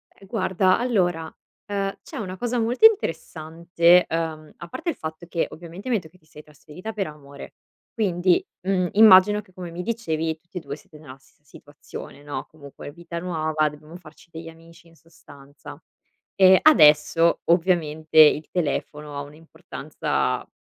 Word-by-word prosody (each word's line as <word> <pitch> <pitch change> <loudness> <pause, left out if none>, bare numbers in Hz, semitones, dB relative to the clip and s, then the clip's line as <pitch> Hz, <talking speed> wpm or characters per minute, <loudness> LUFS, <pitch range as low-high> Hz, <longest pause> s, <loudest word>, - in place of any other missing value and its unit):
Ehm, 195 - -18
guarda, 185 -2 +1
allora, 180 -10 -1 0.3
ehm, 200 -1 -3
c'è - - -10
una 190 -3 -6
cosa 240 +3 -2
molto 240 - +2
interessante 170 - +2
uhm, 160 -2 -4
a 170 - -10
parte 325 - -5
il 325 - -3
fatto 160 +2 -8
che 170 -1 -2
ovviamente 175 +7 -10
mi 245 - +2
hai 210 - -1
detto 160 -3 -16
che 185 - -23
ti 155 - -32
sei 150 -1 -15
trasferita 155 +7 -11
per 200 -3 -3
amore, 140 -2 -12 0.4
quindi, 185 -5 +1 0.2
mhmm, 185 -1 0
immagino 210 -1 +6
che, 190 -3 -25
come 180 -2 -8
mi 170 +1 -6
dicevi, 165 -7 -3
tutti 170 +2 -12
e - - -1
due 140 -4 -7
siete 155 +1 -17
nella 135 -4 -13
stessa 135 +2 -30
situazione, 145 -1 -12
no, 145 -2 -6
comunque 145 -2 -12
vita 170 +2 -8
nuova, 155 -3 -1
dobbiamo 150 +2 -14
farci 165 -1 -18
degli 165 0 -9
amici, 165 +1 -18
in 165 - -22
sostanza. 145 -4 -15 0.6
E 190 -1 +7
adesso 165 - +5
ovviamente 160 -3 0
il 155 0 +6
telefono 150 -3 -4
ha - - -3
un'importanza 150 +3 -4
170 Hz, 165 wpm, -23 LUFS, 155-185 Hz, 0.6 s, E